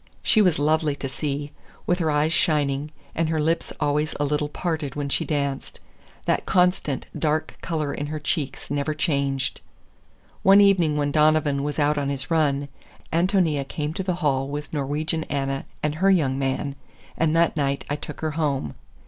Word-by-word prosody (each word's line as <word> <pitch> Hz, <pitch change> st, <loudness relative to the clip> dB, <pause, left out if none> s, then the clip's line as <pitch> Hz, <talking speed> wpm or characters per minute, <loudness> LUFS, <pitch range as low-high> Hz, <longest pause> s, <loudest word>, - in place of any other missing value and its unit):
She 215 Hz, -, +4 dB
was 180 Hz, -6 st, +4 dB
lovely 155 Hz, 0 st, +2 dB
to 140 Hz, -, -4 dB
see, 145 Hz, +1 st, -3 dB, 0.3 s
with 175 Hz, +1 st, +1 dB
her 160 Hz, -2 st, +1 dB
eyes 150 Hz, +2 st, +2 dB
shining, 145 Hz, -3 st, +1 dB, 0.2 s
and 165 Hz, -1 st, 0 dB
her 160 Hz, -1 st, 0 dB
lips 165 Hz, +2 st, 0 dB
always 150 Hz, +1 st, 0 dB
a 145 Hz, -, +2 dB
little 150 Hz, +1 st, 0 dB
parted 155 Hz, -4 st, -3 dB
when 145 Hz, -1 st, -2 dB
she -, -, 0 dB
danced. 140 Hz, -3 st, -2 dB, 0.5 s
That -, -, 0 dB
constant, 180 Hz, -7 st, +2 dB
dark 155 Hz, 0 st, 0 dB
color 155 Hz, -3 st, -2 dB
in 145 Hz, -, -3 dB
her 155 Hz, +1 st, -3 dB
cheeks 145 Hz, -3 st, -3 dB
never 145 Hz, +2 st, -1 dB
changed. 140 Hz, -3 st, 0 dB, 0.8 s
One 195 Hz, +1 st, +7 dB
evening 180 Hz, -7 st, +4 dB
when 145 Hz, -1 st, +1 dB
Donovan 150 Hz, -2 st, +3 dB
was 145 Hz, +1 st, -3 dB
out 150 Hz, 0 st, +2 dB
on 140 Hz, -1 st, -1 dB
his 135 Hz, +2 st, -4 dB
run, 145 Hz, -3 st, +2 dB, 0.5 s
Ántonia 165 Hz, -5 st, +2 dB
came 150 Hz, +1 st, -3 dB
to 190 Hz, -, -3 dB
the 185 Hz, -2 st, -1 dB
hall 135 Hz, -1 st, +2 dB
with 145 Hz, +2 st, -5 dB
Norwegian 150 Hz, +3 st, -1 dB
Anna 135 Hz, -1 st, -2 dB, 0.2 s
and 150 Hz, -1 st, +1 dB
her 185 Hz, +5 st, +2 dB
young 140 Hz, -8 st, +3 dB
man, 135 Hz, +1 st, -1 dB, 0.4 s
and 160 Hz, -1 st, +1 dB
that 165 Hz, -1 st, +3 dB
night 140 Hz, -2 st, -1 dB
I 145 Hz, -, -1 dB
took -, -, -8 dB
her 155 Hz, -1 st, -1 dB
home. 140 Hz, -, -1 dB
150 Hz, 175 wpm, -24 LUFS, 140-160 Hz, 0.8 s, One